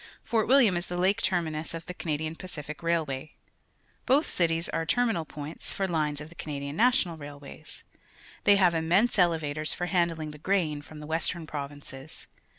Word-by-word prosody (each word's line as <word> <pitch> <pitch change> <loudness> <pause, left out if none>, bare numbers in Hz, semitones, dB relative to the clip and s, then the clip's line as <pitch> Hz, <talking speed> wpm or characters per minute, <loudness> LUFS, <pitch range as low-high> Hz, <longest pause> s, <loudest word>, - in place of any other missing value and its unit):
Fort 225 -2 +1
William 245 -7 +6
is 175 - -3
the 175 - -3
lake 195 +5 +2
terminus 165 -3 0
of 165 - -7
the 180 - -6
Canadian 155 -2 -3
Pacific 150 -4 -7
Railway. 155 -4 -1 0.7
Both 275 +4 +4
cities 165 -1 +2
ai'e 165 0 -1
terminal 225 -7 +2
points 150 +1 -6
for 195 - -1
lines 155 -4 0
of 150 +1 -8
the - - -14
Canadian 140 -2 -5
National 230 - +3
Railways. 145 +1 -9 0.6
They 205 - +7
have 185 -3 +5
immense 180 +8 +3
elevators 155 -3 +2
for 175 - -2
handling 170 -4 0
the 150 - -11
grain 160 -5 0
from 150 +1 -11
the - - -7
Western 165 +2 0
Provinces. 145 -1 -7
165 Hz, 165 wpm, -28 LUFS, 150-180 Hz, 0.7 s, They